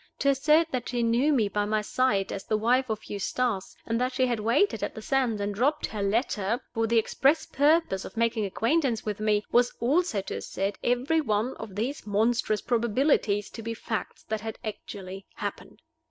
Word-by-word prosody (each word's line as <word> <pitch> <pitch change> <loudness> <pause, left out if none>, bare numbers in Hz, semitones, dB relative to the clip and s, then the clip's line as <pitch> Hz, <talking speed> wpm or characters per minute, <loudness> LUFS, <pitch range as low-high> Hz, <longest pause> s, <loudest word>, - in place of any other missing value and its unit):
To 280 - +2
assert 300 +4 +3
that 250 -2 -3
she 240 -1 0
knew 240 +6 +3
me 235 -8 +3
by 210 +2 0
sight 210 -3 +1
as 195 - -5
the 215 - +1
wife 250 +4 +2
of 215 -1 -3
Eustace, 205 0 -2
and 230 +1 -1
that 255 +1 0
she 260 0 +2
had 240 -3 -1
waited 240 - +2
on - - 0
the - - -7
sands 255 -6 +1
and 205 0 -2
dropped 265 +9 +1
her 210 - -5
letter 210 +1 0
for 225 -1 0
the 230 +1 +2
express 275 +7 +2
purpose 290 - +2
of - - -10
making 230 -1 +1
acquaintance 230 - 0
with 210 -1 -3
me, 210 -1 +1
was 240 0 +3
also 285 - +1
to - - -5
assert 195 +1 -3
every 255 +7 +2
one 220 -1 0
of 215 -4 -8
these 235 +3 -3
monstrous 215 +1 +1
probabilities 235 -3 +1
to 225 - -8
be 230 +1 -4
facts 220 0 -5
that 220 -1 -3
had 220 +1 -5
actually 195 -3 -7
happened! - - -6
230 Hz, 190 wpm, -27 LUFS, 210-260 Hz, -, assert